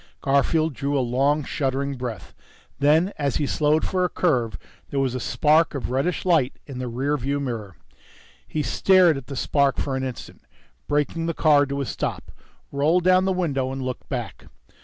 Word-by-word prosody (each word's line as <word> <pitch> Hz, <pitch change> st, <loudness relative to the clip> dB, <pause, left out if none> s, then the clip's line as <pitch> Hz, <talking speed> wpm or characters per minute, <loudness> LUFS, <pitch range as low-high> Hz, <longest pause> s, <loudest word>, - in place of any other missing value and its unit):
Garfield 145 Hz, +3 st, +2 dB
drew 140 Hz, +2 st, -1 dB
a -, -, +2 dB
long, 135 Hz, +4 st, +1 dB
shuddering 140 Hz, 0 st, -2 dB
breath. 125 Hz, -4 st, -6 dB, 0.5 s
Then, 155 Hz, +7 st, +3 dB
as 140 Hz, -3 st, 0 dB
he 145 Hz, -, 0 dB
slowed 150 Hz, +2 st, +1 dB
for 185 Hz, -1 st, 0 dB
a 180 Hz, -, +1 dB
curve, 120 Hz, -, 0 dB, 0.3 s
there 140 Hz, -, -2 dB
was 135 Hz, -2 st, 0 dB
a 130 Hz, -, -3 dB
spark 155 Hz, +5 st, +2 dB
of 135 Hz, -, -4 dB
reddish 145 Hz, +9 st, -1 dB
light 160 Hz, -8 st, +2 dB
in 135 Hz, -3 st, -8 dB
the 130 Hz, -, -3 dB
rear 135 Hz, +5 st, -1 dB
view 140 Hz, +2 st, -2 dB
mirror. 115 Hz, -9 st, -5 dB, 0.7 s
He 155 Hz, -, -2 dB
stared 185 Hz, -2 st, +4 dB
at 135 Hz, -2 st, -7 dB
the 140 Hz, -, -6 dB
spark 140 Hz, 0 st, +1 dB
for 135 Hz, -2 st, -2 dB
an 130 Hz, -, -2 dB
instant, 130 Hz, -3 st, -7 dB, 0.5 s
braked 145 Hz, -1 st, 0 dB
the 165 Hz, 0 st, -3 dB
car 145 Hz, -2 st, +4 dB
to 140 Hz, 0 st, -3 dB
a -, -, -2 dB
stop, -, -, -4 dB, 0.4 s
rolled 155 Hz, +6 st, +2 dB
down 185 Hz, +1 st, +4 dB
the 190 Hz, -, +1 dB
window 140 Hz, -8 st, -1 dB
and 135 Hz, 0 st, -4 dB
looked 130 Hz, 0 st, -5 dB
back. 120 Hz, -, -5 dB
140 Hz, 185 wpm, -23 LUFS, 130-155 Hz, 0.7 s, stared